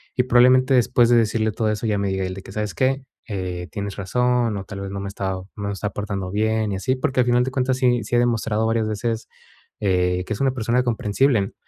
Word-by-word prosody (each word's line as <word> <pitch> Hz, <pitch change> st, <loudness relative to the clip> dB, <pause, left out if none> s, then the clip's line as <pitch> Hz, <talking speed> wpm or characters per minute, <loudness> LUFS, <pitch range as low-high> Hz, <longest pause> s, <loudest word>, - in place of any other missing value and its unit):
Y 125 Hz, -, +3 dB
probablemente 130 Hz, +2 st, +5 dB
después 120 Hz, -1 st, +4 dB
de 120 Hz, 0 st, +5 dB
decirle 110 Hz, -1 st, +1 dB
todo 110 Hz, +1 st, -1 dB
eso, 105 Hz, +1 st, -2 dB
ella 105 Hz, -2 st, +1 dB
me 100 Hz, -, 0 dB
diga 95 Hz, -1 st, -1 dB
el 95 Hz, -, -4 dB
de 95 Hz, -, -8 dB
que: -, -, -12 dB
"¿Sabes 105 Hz, -1 st, -3 dB
qué? 135 Hz, +1 st, 0 dB, 0.2 s
Eh, 90 Hz, -4 st, -4 dB
tienes 100 Hz, -2 st, -5 dB
razón, 120 Hz, +2 st, 0 dB
o 95 Hz, -, -5 dB
tal 100 Hz, +1 st, -8 dB
vez 100 Hz, -, -5 dB
no 100 Hz, 0 st, -5 dB
me 100 Hz, -, -5 dB
he -, -, -4 dB
estado 95 Hz, -1 st, -4 dB
no 100 Hz, -, -5 dB
me -, -, -2 dB
he -, -, -2 dB
estado 100 Hz, +1 st, -4 dB
portando 100 Hz, -3 st, -4 dB
bien 110 Hz, +1 st, 0 dB
y 95 Hz, -, -2 dB
así". 130 Hz, +7 st, 0 dB
Porque 130 Hz, 0 st, -1 dB
al 125 Hz, -, +3 dB
final 120 Hz, 0 st, +3 dB
de 130 Hz, -, -3 dB
cuentas 130 Hz, 0 st, 0 dB
sí 125 Hz, -3 st, +2 dB
sí 105 Hz, -, -2 dB
ha -, -, +5 dB
demostrado 115 Hz, -2 st, +1 dB
varias 115 Hz, -1 st, +1 dB
veces, 110 Hz, +2 st, -3 dB, 0.5 s
eh, 90 Hz, -2 st, +1 dB
que 110 Hz, -, -3 dB
es 105 Hz, -, -5 dB
una 135 Hz, -1 st, +3 dB
persona 120 Hz, 0 st, 0 dB
comprensible, 115 Hz, -1 st, +1 dB
110 Hz, 255 wpm, -22 LUFS, 100-125 Hz, 0.5 s, probablemente